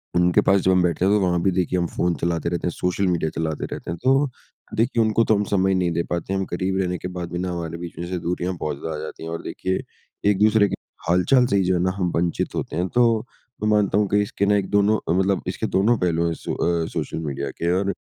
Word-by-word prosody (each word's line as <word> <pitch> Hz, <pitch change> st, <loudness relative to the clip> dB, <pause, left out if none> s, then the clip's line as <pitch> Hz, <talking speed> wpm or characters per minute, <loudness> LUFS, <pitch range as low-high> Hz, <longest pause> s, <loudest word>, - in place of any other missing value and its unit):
उनके 90 Hz, 0 st, +4 dB
पास 100 Hz, 0 st, +5 dB
जो 95 Hz, -, +3 dB
हम 90 Hz, -1 st, +4 dB
बैठते 90 Hz, +1 st, +1 dB
हैं 100 Hz, -, +4 dB
तो 105 Hz, -, +4 dB
वहाँ 85 Hz, -2 st, +1 dB
भी 95 Hz, -, +2 dB
देखिए 90 Hz, 0 st, 0 dB
हम 85 Hz, -, +1 dB
फ़ोन 85 Hz, -1 st, 0 dB
चलाते 85 Hz, -1 st, 0 dB
रहते 85 Hz, 0 st, -2 dB
हैं -, -, 0 dB
सोशल 90 Hz, +3 st, -1 dB
मीडिया 85 Hz, -3 st, +1 dB
चलाते 80 Hz, -2 st, -2 dB
रहते -, -, -5 dB
हैं। 85 Hz, -, -4 dB
तो 135 Hz, +1 st, +3 dB, 0.5 s
देखिए 115 Hz, +1 st, +2 dB
उनको 110 Hz, +1 st, +2 dB
तो 110 Hz, -, +3 dB
हम 105 Hz, -, +1 dB
समय 95 Hz, -1 st, +3 dB
नहीं 90 Hz, -2 st, +1 dB
दे 85 Hz, +1 st, 0 dB
पाते 85 Hz, +2 st, -2 dB
हम 95 Hz, 0 st, 0 dB
करीब 95 Hz, +2 st, -2 dB
रहने 90 Hz, -1 st, -1 dB
के 90 Hz, -, -5 dB
बाद 85 Hz, -1 st, -5 dB
भी 90 Hz, -, -3 dB
ना 90 Hz, 0 st, -2 dB
हमारे 85 Hz, -1 st, -4 dB
बीच 85 Hz, -1 st, -8 dB
में 85 Hz, -, -4 dB
से 90 Hz, -, -2 dB
दूरियाँ 90 Hz, +1 st, -2 dB
बहुत 75 Hz, -3 st, -3 dB
ज़्यादा 80 Hz, -1 st, -4 dB
आ -, -, -5 dB
जाती 80 Hz, -, -8 dB
हैं। 80 Hz, -, -5 dB
और 85 Hz, -, -4 dB
देखिए 95 Hz, 0 st, -2 dB, 0.5 s
एक-दूसरे 105 Hz, +1 st, +4 dB
के -, -, -2 dB, 0.3 s
हाल-चाल 125 Hz, +9 st, +4 dB
से 100 Hz, -, +1 dB
ही 95 Hz, -, +3 dB
जो 90 Hz, +1 st, +2 dB
है 90 Hz, -, +1 dB
ना 95 Hz, -, +2 dB
हम 90 Hz, -3 st, 0 dB
वंचित 85 Hz, 0 st, -1 dB
होते -, -, -3 dB
हैं 90 Hz, +2 st, 0 dB
तो 115 Hz, -2 st, +3 dB, 0.4 s
मैं 105 Hz, -, +2 dB
मानता 105 Hz, -2 st, +3 dB
हूँ 105 Hz, -1 st, +2 dB
कि 105 Hz, 0 st, +3 dB
इसके 100 Hz, 0 st, -1 dB
ना 105 Hz, 0 st, +3 dB
एक 100 Hz, -2 st, 0 dB
दोनों 105 Hz, +1 st, +3 dB, 0.2 s
मतलब 95 Hz, 0 st, +1 dB
इसके -, -, -2 dB
दोनों 110 Hz, +4 st, +3 dB
पहलू 85 Hz, -1 st, +1 dB
हैं 85 Hz, -, 0 dB
सो -, -, -5 dB, 0.3 s
अ -, -, -2 dB
सोशल -, -, -3 dB
मीडिया 70 Hz, -2 st, -3 dB
के। 85 Hz, +1 st, -1 dB
और 100 Hz, -, -1 dB
90 Hz, 265 wpm, -23 LUFS, 85-100 Hz, 0.5 s, पास